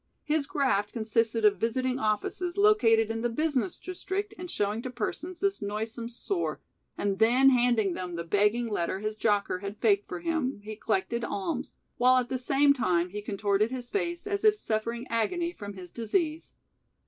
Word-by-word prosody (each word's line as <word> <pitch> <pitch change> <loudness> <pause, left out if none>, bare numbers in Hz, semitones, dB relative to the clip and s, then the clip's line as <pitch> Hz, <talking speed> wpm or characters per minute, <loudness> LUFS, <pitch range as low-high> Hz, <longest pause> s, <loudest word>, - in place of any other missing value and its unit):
His 300 -2 0
graft 230 -8 0
consisted 225 0 +1
of 200 -3 +4
visiting 255 +3 0
offices 245 - -1
located 225 - +4
in 225 0 -3
the 240 - +1
business 305 +6 0
district 380 +2 -4
and 360 +1 -8
showing 210 -2 -1
to 255 - -5
persons 315 +9 -4
this 395 0 0
noisome 220 +3 -4
sore, 345 - -3 0.4
and 200 -1 -1
then 250 +4 +6
handing 240 -6 +3
them 180 -1 -5
the 170 - -3
begging 210 +7 +2
letter 190 -4 -1
his 215 0 -2
jocker 205 -4 +1
had 200 +1 -6
faked 400 - +2
for - - -4
him, 320 -8 -1
he 215 +1 -6
collected 220 +2 -1
alms, 220 +7 -3 0.2
while 255 +1 +5
at 250 -1 0
the 260 - -1
same 280 +3 +4
time 180 -9 +1
he 210 +3 -5
contorted 205 +1 0
his 250 -1 -6
face 345 -3 -2
as 400 0 -2
if 430 -1 +6
suffering 230 - -2
agony 340 +10 0
from 205 - -8
his 180 -2 -10
"disease". 305 - -2
235 Hz, 175 wpm, -28 LUFS, 210-305 Hz, 0.4 s, then